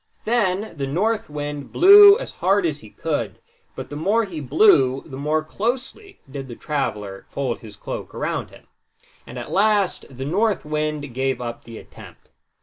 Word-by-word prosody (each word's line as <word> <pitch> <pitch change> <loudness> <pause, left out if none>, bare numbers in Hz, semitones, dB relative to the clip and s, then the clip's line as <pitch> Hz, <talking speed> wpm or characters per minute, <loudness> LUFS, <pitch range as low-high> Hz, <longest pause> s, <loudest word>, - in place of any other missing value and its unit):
Then 210 -3 0
the 140 -3 -3
North 210 +9 -1
Wind 145 -1 -6
blew 405 +2 +9
as - - -7
hard 195 +1 +3
as 155 -3 -2
he 110 - -14
could, 120 - -3 0.4
but - - -8
the - - -5
more 205 +9 +1
he 175 -6 -7
blew 135 -3 +4
the 130 - -9
more 150 +3 -1
closely 245 - -4
did 135 0 -7
the 120 - -8
traveler 105 -10 -4
fold 130 -4 -3
his 105 -2 -12
cloak - - -7
around - - -3
him; - - -17 0.6
and - - -9
at - - -7
last 205 -2 +1
the 130 0 -7
North 200 +6 0
Wind 150 -3 -3
gave 135 +1 -1
up 120 -1 -6
the 115 -1 -10
attempt. - - -15
150 Hz, 170 wpm, -22 LUFS, 135-205 Hz, 0.6 s, blew